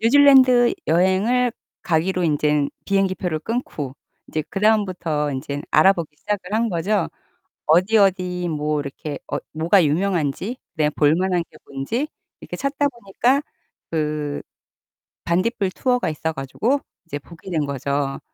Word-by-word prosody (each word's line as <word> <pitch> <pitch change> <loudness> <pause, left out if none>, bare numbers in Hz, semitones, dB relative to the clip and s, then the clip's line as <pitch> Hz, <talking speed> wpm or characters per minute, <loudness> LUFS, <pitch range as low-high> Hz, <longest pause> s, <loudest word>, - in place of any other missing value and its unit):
뉴질랜드 255 -1 +6
여행을 190 +9 +2 0.3
가기로 180 +2 +1
인제는 150 -2 +1
비행기 195 -1 +1
표를 175 -5 -2
끊고 155 - -4 0.3
이제 155 - -2
그다음부터 185 -8 +1
인제는 140 +2 -4
알아보기 170 -5 +3
시작을 200 +2 -4
한 230 +1 +2
거죠. 185 +1 0 0.6
어디, 185 +8 +4
어디 180 -3 +2
뭐 150 -1 -1
이렇게 145 +2 -5
어 145 - 0 0.2
뭐가 165 +4 +4
유명한지 180 - 0 0.2
그다음에 150 -1 +1
볼 150 +1 +3
만한 180 -1 +1
게 - - -17
뭔지 140 - -3 0.3
이렇게 - - -7
찾다 280 +1 0
보니까 240 +2 0 0.5
그 150 -2 -2 0.8
반딧불 185 +3 0
투어가 250 -1 0
있어 160 +1 -3
가지고 210 - -1 0.3
이제 145 -3 -5
보게 170 +5 -13
된 155 -4 0
거죠. 140 0 -2
180 Hz, 300 characters per minute, -22 LUFS, 150-210 Hz, 0.8 s, 뉴질랜드